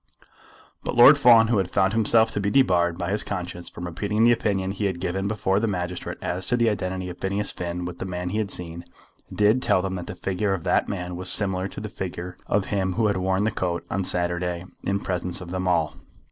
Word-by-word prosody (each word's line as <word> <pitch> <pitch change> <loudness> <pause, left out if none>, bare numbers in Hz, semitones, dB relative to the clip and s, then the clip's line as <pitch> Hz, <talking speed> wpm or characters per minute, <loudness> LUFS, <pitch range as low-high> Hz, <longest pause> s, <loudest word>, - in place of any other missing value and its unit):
But - - -3
Lord 120 +5 +9
Fawn, 115 -4 +6
who 115 -4 +3
had 95 -2 -1
found 95 0 +2
himself 110 0 +4
to - - -2
be 100 0 0
debarred 90 -9 +3
by 90 +1 -3
his 105 - +1
conscience 90 -3 -5
from 90 - -8
repeating 100 +6 -1
the 120 - +6
opinion 100 -5 0
he 100 +1 -3
had 95 -3 -1
given 95 +2 -2
before 100 -2 0
the 115 - 0
magistrate 90 -3 -4
as 90 +1 -2
to 125 - +2
the 120 -1 +3
identity 95 -2 -3
of 90 0 -9
Phineas 100 +2 -1
Finn 90 0 -4
with 90 -1 -7
the - - -4
man 90 -1 -4
he 105 +4 -1
had 105 -2 -2
seen, 85 -2 -5 0.5
did 105 +4 +3
tell 100 -6 +2
them 95 -1 -2
that 90 - -7
the - - -6
figure 95 +2 -1
of 85 - -7
that - - +1
man 90 -2 -4
was 90 +1 -2
similar 95 -2 +2
to - - -9
the 105 - -5
figure 90 -2 -6
of 100 -2 +1
him 95 -2 0
who 110 +4 +1
had 100 -2 +1
worn 95 +1 0
the 110 - +1
coat 90 -4 -2
on 95 - 0
Saturday 90 0 -1 0.2
in 100 0 0
presence 90 -2 -2
of 90 -2 -9
them 95 0 -2
all. 85 -3 +1
95 Hz, 235 wpm, -24 LUFS, 90-105 Hz, 0.5 s, Lord